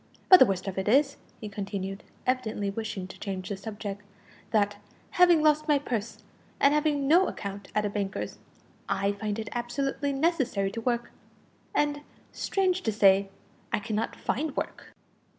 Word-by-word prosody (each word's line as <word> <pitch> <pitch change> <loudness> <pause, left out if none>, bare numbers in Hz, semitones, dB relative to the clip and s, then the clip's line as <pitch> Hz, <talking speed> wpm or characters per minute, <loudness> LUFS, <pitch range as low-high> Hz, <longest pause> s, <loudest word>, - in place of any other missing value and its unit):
But 370 - +11
the 260 - +8
worst 190 0 -2
of 190 0 -2
it 190 - -3
is," 275 +5 +4 0.2
he 215 - -6
continued, 195 -1 -4 0.2
evidently 220 -6 0
wishing 210 -3 -4
to - - -12
change 190 -2 -4
the 200 - -2
subject, 205 0 -6 0.5
"that, 205 -2 +1 0.3
having 350 -3 +5
lost 305 0 +3
my 295 -2 +5
purse, 235 -6 -4 0.4
and 280 - +5
having 295 -2 +1
no 350 +6 +5
account 200 -1 -6
at 210 0 +2
a - - 0
banker's, 200 -1 -3 0.5
I 200 +1 +1
find 205 0 -3
it 220 -1 -4
absolutely 270 +4 -2
necessary 270 - +1
to 230 - -5
work, 240 0 -1 0.6
and, 290 0 +1 0.3
strange 375 -1 0
to 220 - 0
say, 195 -1 +4 0.4
I - - +2
cannot 215 +1 -2
find 290 +3 -2
work." - - -4
220 Hz, 160 wpm, -28 LUFS, 200-280 Hz, 0.6 s, But